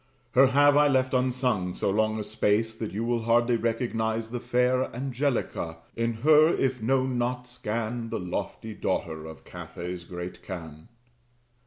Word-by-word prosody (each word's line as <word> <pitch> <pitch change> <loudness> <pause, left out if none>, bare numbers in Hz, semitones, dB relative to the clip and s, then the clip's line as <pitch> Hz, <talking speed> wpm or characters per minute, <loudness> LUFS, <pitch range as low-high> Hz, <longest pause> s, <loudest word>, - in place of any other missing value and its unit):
Her 130 +3 +6
have 145 +2 +5
I 150 0 +6
left 130 -2 +2
unsung 125 -8 +1
so - - 0
long 110 +1 +1
a - - -2
space, 110 +1 +1
That 110 -1 -5
you 105 +4 -3
will 120 0 0
hardly 120 +1 +3
recognize 115 -1 -1
the 120 - -3
fair 125 +2 +2
Angelica: 125 - -2 0.2
in 115 0 0
her 155 0 +7
(if 130 -6 0
known 130 +1 +1
not) 125 +1 -2
scan 115 -1 -3
The - - -2
lofty 90 +4 -4
daughter 80 -5 -2
of 80 -1 -11
Catay's 90 0 -7
great 90 0 -7
khan. 80 -4 -8
115 Hz, 155 wpm, -27 LUFS, 105-125 Hz, 0.2 s, her